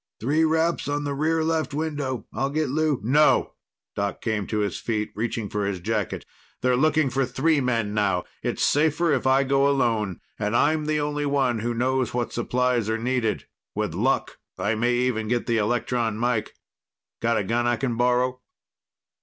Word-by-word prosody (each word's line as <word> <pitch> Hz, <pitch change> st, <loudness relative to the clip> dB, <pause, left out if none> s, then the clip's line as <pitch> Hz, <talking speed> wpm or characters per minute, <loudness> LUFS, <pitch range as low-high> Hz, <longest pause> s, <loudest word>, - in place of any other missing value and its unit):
"Three 145 Hz, +8 st, +2 dB
raps 160 Hz, +1 st, +1 dB
on 145 Hz, 0 st, -1 dB
the 145 Hz, -1 st, -2 dB
rear 160 Hz, +3 st, +1 dB
left 160 Hz, -2 st, -1 dB
window. 145 Hz, -6 st, -3 dB
I'll 135 Hz, +5 st, -1 dB
get 155 Hz, 0 st, -1 dB
Lou." 155 Hz, 0 st, +1 dB
"No!" 145 Hz, +7 st, +3 dB, 0.4 s
Doc 100 Hz, 0 st, -2 dB
came 110 Hz, -4 st, -2 dB
to 110 Hz, -, -2 dB
his 100 Hz, -4 st, -2 dB
feet, 110 Hz, -2 st, -2 dB
reaching 115 Hz, 0 st, -2 dB
for 105 Hz, 0 st, -2 dB
his 100 Hz, -2 st, -2 dB
jacket. 110 Hz, +6 st, -2 dB, 0.4 s
"They're 125 Hz, 0 st, +3 dB
looking 155 Hz, 0 st, +2 dB
for 135 Hz, +2 st, +1 dB
three 140 Hz, +4 st, +1 dB
men 115 Hz, -5 st, 0 dB
now. 95 Hz, -4 st, +1 dB, 0.2 s
It's -, -, -2 dB
safer 155 Hz, +2 st, +2 dB
if 130 Hz, -1 st, 0 dB
I 135 Hz, +1 st, +4 dB
go 140 Hz, +1 st, +3 dB
alone 115 Hz, -8 st, 0 dB, 0.2 s
and 105 Hz, +1 st, -1 dB
I'm 155 Hz, +4 st, +2 dB
the 155 Hz, 0 st, 0 dB
only 145 Hz, 0 st, -1 dB
one 135 Hz, -5 st, +1 dB
who 120 Hz, +2 st, -2 dB
knows 130 Hz, +1 st, 0 dB
what 120 Hz, -2 st, -2 dB
supplies 120 Hz, -1 st, 0 dB
are 110 Hz, -, +1 dB
needed. 120 Hz, -2 st, -1 dB, 0.3 s
With -, -, -2 dB
luck, -, -, 0 dB, 0.2 s
I 105 Hz, -, 0 dB
may 120 Hz, +2 st, +1 dB
even 120 Hz, -3 st, 0 dB
get 120 Hz, +1 st, 0 dB
the 115 Hz, -1 st, +1 dB
electron 115 Hz, 0 st, 0 dB
mike. 120 Hz, -1 st, -1 dB, 0.7 s
Got 115 Hz, 0 st, +2 dB
a -, -, 0 dB
gun 120 Hz, +4 st, 0 dB
I 120 Hz, -, +2 dB
can 125 Hz, -1 st, -2 dB
borrow?" 125 Hz, +1 st, +1 dB
125 Hz, 180 wpm, -24 LUFS, 115-145 Hz, 0.7 s, I